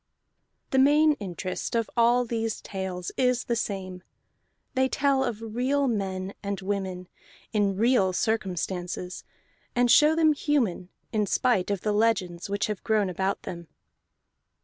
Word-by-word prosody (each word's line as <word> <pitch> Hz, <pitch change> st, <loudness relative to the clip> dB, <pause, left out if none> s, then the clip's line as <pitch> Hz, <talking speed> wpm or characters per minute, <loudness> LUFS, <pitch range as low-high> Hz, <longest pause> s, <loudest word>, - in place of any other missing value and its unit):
The 265 Hz, -, +3 dB
main 300 Hz, +3 st, +5 dB
interest 185 Hz, +1 st, -4 dB
of 230 Hz, -1 st, +1 dB
all 240 Hz, +1 st, +4 dB
these 225 Hz, -1 st, -2 dB
tales 190 Hz, -2 st, -5 dB
is 250 Hz, -1 st, +2 dB
the 235 Hz, -, -1 dB
same: 190 Hz, -5 st, -4 dB, 0.7 s
they 260 Hz, 0 st, +2 dB
tell 275 Hz, -1 st, +2 dB
of 225 Hz, -2 st, -4 dB
real 275 Hz, +3 st, +1 dB
men 195 Hz, -4 st, -2 dB
and 200 Hz, -1 st, -3 dB
women 190 Hz, -2 st, -3 dB, 0.5 s
in 205 Hz, -2 st, +2 dB
real 225 Hz, -4 st, +3 dB
circumstances, 180 Hz, -3 st, -2 dB, 0.5 s
and 245 Hz, -1 st, +3 dB
show 300 Hz, +4 st, +6 dB
them 315 Hz, -1 st, +4 dB
human 255 Hz, -, 0 dB, 0.2 s
in 210 Hz, -2 st, +1 dB
spite 235 Hz, -4 st, +1 dB
of 200 Hz, -3 st, -1 dB
the 210 Hz, -, 0 dB
legends 200 Hz, -5 st, 0 dB
which 200 Hz, 0 st, 0 dB
have 210 Hz, -3 st, -4 dB
grown 210 Hz, -4 st, +1 dB
about 190 Hz, +2 st, -2 dB
them. 170 Hz, -1 st, -7 dB
210 Hz, 140 wpm, -27 LUFS, 190-245 Hz, 0.7 s, show